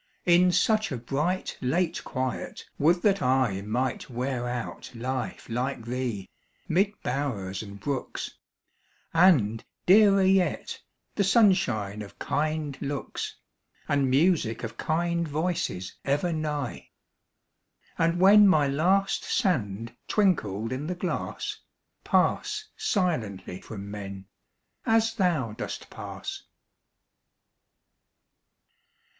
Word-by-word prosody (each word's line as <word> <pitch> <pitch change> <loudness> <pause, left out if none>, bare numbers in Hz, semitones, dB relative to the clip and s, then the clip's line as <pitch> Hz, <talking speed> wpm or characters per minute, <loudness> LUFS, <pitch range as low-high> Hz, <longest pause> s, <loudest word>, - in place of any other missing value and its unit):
In 180 +1 +5
such 215 +4 +2
a 130 - -2
bright, 150 +10 -2
late 160 +7 0
quiet, 130 -2 -4
would 170 +4 +3
that 200 -2 +3
I 125 -7 +2
Might 120 +7 -2
wear 125 0 -2
out 120 -1 -5
life 130 +2 -4
like 125 0 -2
thee, 120 -5 -3 0.4
mid 195 +5 +2
bowers 120 -8 -2
and 100 -2 -9
brooks, 135 +4 -4 0.8
And, 140 - +4 0.2
dearer 200 0 +6
yet, 190 -1 +1 0.3
the 200 - +1
sunshine 180 - +3
of 100 - -10
kind 155 -2 -2
looks, 140 0 -4 0.5
And 140 -2 +2
music 140 -5 +2
of 115 0 -5
kind 170 +4 0
voices 155 - -2
ever 145 +6 0
nigh; 150 -4 -3 1.1
And 165 +1 +1
when 205 +2 +8
my 155 -7 +4
last 185 +8 +2
sand 115 - -1
twinkled 115 - +1
in 140 +4 -4
the 180 - -2
glass, 180 0 -3 0.4
Pass 425 +1 +1
silently 125 - -1
from 100 -2 -8
men, 100 -2 -7 0.6
as 225 0 +3
thou 170 - +1
dost 110 - -6
pass. - - -6
145 Hz, 105 wpm, -27 LUFS, 115-180 Hz, 1.1 s, when